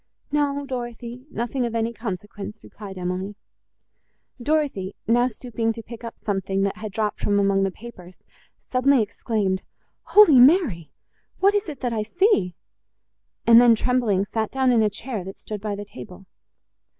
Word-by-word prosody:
"No, 285 -1 0
Dorothée, 240 -1 -6
nothing 240 +1 -2
of 235 -1 -2
any 230 +1 0
consequence," 210 -1 -6
replied 200 -3 -10
Emily. 185 +3 -3 1.1
Dorothée, 275 -9 0
now 240 +2 +3
stooping 230 -1 -3
to 230 0 -9
pick 235 +1 -10
up 230 - -7
something, 195 -1 -1
that 200 +1 -1
had 215 -1 -6
dropped 210 +1 -2
from 205 0 +1
among 195 -1 +2
the 195 - +2
papers, 185 -3 -12 0.4
suddenly 255 -1 +2
exclaimed, 205 -2 -2 0.4
"Holy 400 -11 +7
Mary! 250 - +4 0.5
what 395 +1 +4
is 410 -4 0
it 285 -4 -9
I 230 -3 0
see?" 225 - +1 0.9
and 230 0 +8
then, 240 -2 +6
trembling, 220 -5 +1
sat 220 +2 -2
down 265 -1 +2
in 235 -2 +4
a 215 - +3
chair, 220 0 -5
that 190 +1 -9
stood 210 -2 -7
by 210 -1 -3
the 205 +1 -7
table. 180 +6 -11
225 Hz, 155 wpm, -23 LUFS, 200-250 Hz, 1.1 s, and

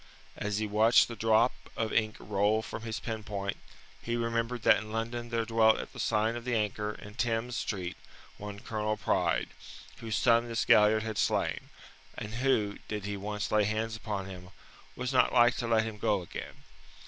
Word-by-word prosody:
As 105 -1 -2
he 110 - 0
watched 110 +3 +5
the 115 - -7
drop 115 +2 +3 0.3
of 110 -1 -1
ink 110 -1 +1
roll 105 +2 +1
from - - -6
his 110 0 -4
pen 110 -2 -4
point, 100 -1 -3 0.4
he 120 - -2
remembered 115 0 -1
that - - +6
in 110 0 -7
London 115 +2 -3
there 115 -1 0
dwelt 110 -1 +4
at - - -7
the - - -10
sign 110 +1 +1
of 120 - -5
the 125 -1 -1
Anchor, 105 -1 -1
in 105 0 -11
Thames 115 +1 -1
Street, 90 -6 -3 0.4
one 105 0 -7
Colonel 110 -1 -2
Pride, - - +1 0.5
whose 115 -1 -3
son 115 -1 +4
this 115 -1 -1
Galliard 110 +1 +5
had 110 -2 -3
slain, - - 0 0.5
and 105 +1 -6
who, 110 -7 +1
did 105 -2 -4
he 100 0 -3
once 105 +1 -4
lay 105 -1 +4
hands 110 +1 -1
upon 105 -3 -4
him, 90 -1 -9 0.5
was 125 +1 -3
not 130 - +4
like 120 0 +5
to 120 - -2
let 115 -1 +3
him 110 -1 -6
go 100 -3 +1
again. 85 - -8
110 Hz, 190 wpm, -30 LUFS, 105-115 Hz, 0.5 s, that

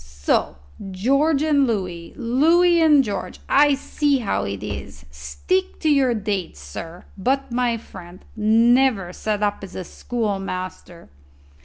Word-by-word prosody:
"So 70 -1 -1 0.3
George 275 +10 +1
and 285 -3 +3
Louis 180 -6 -3
Louis 335 +8 +3
and 300 -4 +5
George. 200 -5 -5
I 290 0 +4
see 285 +1 0
how 195 - -2
it 100 0 -5
is. 70 -8 -7
Stick 70 - -3
to 315 - +1
your 265 -4 +3
dates, 200 - -3
sir. 165 - -9
But, 270 +6 -1
my 240 -1 0
friend, 175 -4 -13
never 225 -2 +3
set 210 +1 -2
up 205 0 0
as 190 - -9
a 185 - -4
schoolmaster." 195 -5 -5
215 Hz, 135 wpm, -22 LUFS, 175-275 Hz, 0.3 s, and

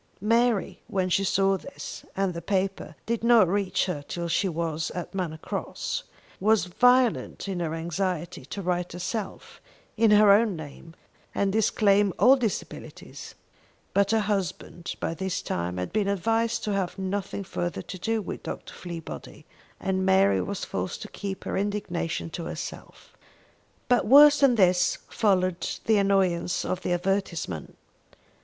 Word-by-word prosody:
Mary, 230 0 +1
when 185 -1 -1
she 195 +2 +2
saw 195 0 +2
this, 275 - -9
and 195 -2 +1
the 170 - -6
paper 190 -5 -2
did 230 0 -2
not 235 -5 +6
reach 195 +1 0
her 180 -6 -3
till 170 -1 -4
she 190 +3 +1
was 165 -2 -2
at 180 +2 -5
Manor 175 -5 -3
Cross, - - -4 0.3
was 215 -1 +3
violent 245 +4 +2
in 190 -2 -3
her 165 -2 -2
anxiety 170 +1 -3
to 200 - -6
write 180 -1 -1
herself, 190 +3 -5 0.4
in 225 0 +4
her 210 -1 +7
own 210 -1 +4
name, 155 +1 -10 0.4
and 195 -1 +1
disclaim 205 -2 +3
all 260 +2 +7
disabilities; 235 -7 -5 0.6
but 200 0 +3
her 220 0 +3
husband 195 -3 -3
by - - -2
this 185 +1 -3
time 90 +1 -3
had 90 - -4
been 210 -2 +1
advised 225 +4 0
to 210 - -1
have 195 -2 -2
nothing 195 +1 -3
further 175 -2 -4
to 185 - -8
do 225 +2 -1
with - - -6
Dr. - - -7
Fleabody, 170 -2 -8 0.3
and 190 0 -1
Mary 190 +1 +4
was 200 -1 -4
forced 185 - -4
to 210 - -9
keep 195 -2 -6
her - - -3
indignation 195 -5 -2
to 170 - -5
herself. - - -8 0.7
But 245 -3 +2
worse 290 +4 +8
than 275 -3 +5
this 180 -4 +3
followed 185 -5 +1 0.2
the 220 -1 +4
annoyance 190 -3 +1
of 185 - -2
the - - -2
advertisement. 175 - -2
195 Hz, 150 wpm, -26 LUFS, 175-210 Hz, 0.7 s, worse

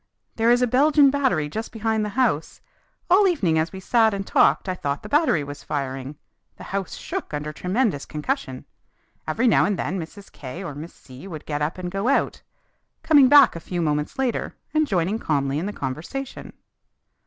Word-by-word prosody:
"There 225 +1 +2
is 245 +1 +4
a - - +5
Belgian 280 +3 +4
battery 260 - +1
just 220 +10 -5
behind 220 -1 -1
the 210 - -2
house. 225 - 0 0.5
All 385 +3 +5
evening 190 - +1
as 160 +2 -1
we 190 - -8
sat 220 +1 +2
and 195 0 -4
talked - - +3
I 185 - 0
thought 145 -5 -3
the - - -8
battery 295 - +2
was 145 0 -9
firing; 135 -1 -4 0.4
the - - -10
house 195 -2 -4
shook - - -5
under 150 +1 -4
tremendous 185 - -1
concussion. 130 -3 -4 0.6
Every 225 +11 +1
now 225 - +5
and 205 -2 0
then 190 - -2
Mrs. 195 +5 -10
K 140 +8 -8
or 170 - -6
Miss 155 +4 -9
C 130 +7 -13
would 155 -5 -8
get 150 -1 -3
up 150 +4 -2
and 180 -1 -5
go 195 +4 -2
out, 275 - +1 0.6
coming 290 -4 +6
back 285 -7 +7
a - - -5
few 175 +1 -5
moments 150 - -1
later 260 -3 -2 0.2
and 310 -1 +2
joining 190 +1 0
calmly 140 - 0
in 180 - -3
the - - -3
conversation. 170 - -6
185 Hz, 190 wpm, -23 LUFS, 150-240 Hz, 0.6 s, back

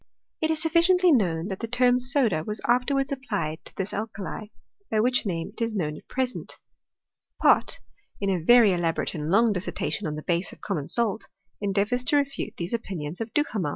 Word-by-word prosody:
It 315 - +1
is 320 -1 +2
sufficiently 345 +2 +4
known 175 - +2
Sbat 190 -2 -5
the 230 - -4
term 245 +1 +3
soda 250 - +3
was 210 +4 -4
afterwards 270 +3 +1
applied 205 - -3
to - - -11
this 190 +1 -3
al 215 +2 -2
kali; 210 +1 -7 0.4
by 215 - +1
which 245 0 +2
name 165 -3 -3
it - - -10
is 230 -1 -1
known 155 -6 -1
at - - -14
present. 255 -1 -3 0.8
Pott, - - +4 0.4
in 200 -1 0
a 185 - 0
yery 230 -2 +6
elaborate 170 -2 -1
and 150 -4 -4
Iqng 225 +2 +4
dissertation 190 +1 -3
on 150 - -3
the 155 - -7
base 170 0 0
of - - -14
common 155 -8 -3
salt, 225 -3 0 0.3
endeavours 205 +5 0
to 290 - +3
refute 280 -1 -2
these 170 +4 -4
opinions 180 -7 -4
of 225 0 -4
Duhamel. 225 - 0
215 Hz, 190 wpm, -26 LUFS, 180-250 Hz, 0.8 s, yery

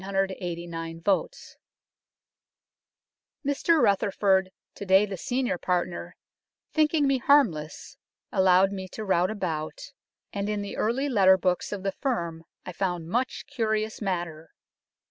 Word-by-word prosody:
10,989 175 -4 -3 2.5
Mr 295 +4 +2
Rutherford, 195 -3 +2 0.2
to - - -8
day 190 +1 +5
the 200 -2 -5
senior 245 +1 -1
partner, 180 -1 -2 0.6
thinking 310 -1 +3
me 275 -1 +2
harmless 195 - +1 0.3
allowed 190 0 +4
me 190 -1 -5
to 215 +3 -7
rout 180 -2 +2
about, 185 - -4 0.4
and 200 0 -2
in 210 -1 -1
the 200 - -6
early 250 +6 0
letter 190 -7 +5
books 180 -1 -1
of 200 -2 -5
the 195 - 0
firm 170 - -3 0.2
I - - -5
found 175 -3 -3
much 250 +6 -1
curious 220 -5 -2
matter. 175 -5 -3
195 Hz, 120 wpm, -27 LUFS, 180-220 Hz, 2.5 s, day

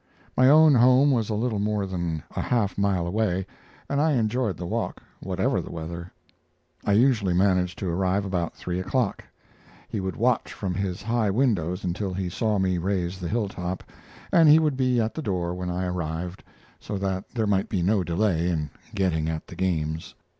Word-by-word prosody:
My 130 +1 +6
own 155 +1 +7
home 130 +3 +5
was 115 -5 +1
a 110 - 0
little 110 -1 -1
more 105 -1 0
than 85 -5 -3
a - - 0
half 105 -6 0
mile 100 -3 +1
away, 95 0 0 0.4
and 140 +1 0
I 155 0 +3
enjoyed 115 - 0
the 90 - -5
walk, - - -2 0.2
whatever - - 0
the - - -9
weather. 85 +2 -6 0.7
I 100 - +2
usually 110 -5 +3
managed 90 -1 +2
to 95 - -3
arrive 95 +3 0
about 90 -3 -2
three 90 0 -4
o'clock. 115 +3 -1 0.6
He 105 - -3
would 95 -1 -3
watch 120 +1 +1
from 95 -3 -3
his 95 -1 -3
high 115 -1 +1
windows 95 -6 +1
until 90 +1 -2
he 95 -1 -2
saw 105 +3 0
me 95 -2 +1
raise 90 0 -1
the 85 -2 -4
hilltop, 95 -5 -2 0.5
and 165 -3 +6
he 150 - +9
would 155 -3 +2
be 130 -2 +2
at 110 0 0
the 160 - -4
door 90 - -1
when 90 0 -4
I 90 +1 -2
arrived, 90 0 -4 0.4
so 105 - -5
that 95 -1 -3
there 110 -2 +1
might 100 -2 +1
be 95 -4 0
no 100 +1 +2
delay 85 0 +1
in 75 -4 -2 0.2
getting 80 -5 +1
at 80 -1 -4
the 90 - -11
games. 80 -3 -2
95 Hz, 190 wpm, -25 LUFS, 90-110 Hz, 0.7 s, he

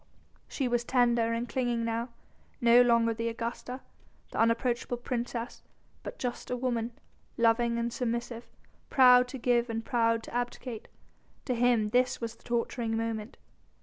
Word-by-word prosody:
She 270 - -2
was 240 -1 0
tender 240 -2 +2
and 230 +1 -2
clinging 240 -2 -1
now, 230 +2 -2 0.5
no 235 +1 +6
longer 235 -1 +3
the 230 +1 -2
Augusta, 235 +3 -5 0.5
the - - -4
unapproachable 235 +2 +1
princess 240 -1 -4 0.4
but - - -8
just 245 -1 -4
a 250 - -1
woman, 240 -2 -2 0.4
loving 235 0 +3
and 235 0 -2
submissive, 235 -1 -3 0.4
proud 250 -2 +6
to 265 - -7
give 240 -1 +1
and 225 0 -3
proud 230 -1 +1
to - - -10
abdicate. 245 -1 -4 0.6
To 255 - 0
him 235 -3 +2
this 250 +2 +2
was 230 -1 -4
the - - -24
torturing 235 -1 -1
moment. 225 0 -4
235 Hz, 150 wpm, -29 LUFS, 230-245 Hz, 0.6 s, no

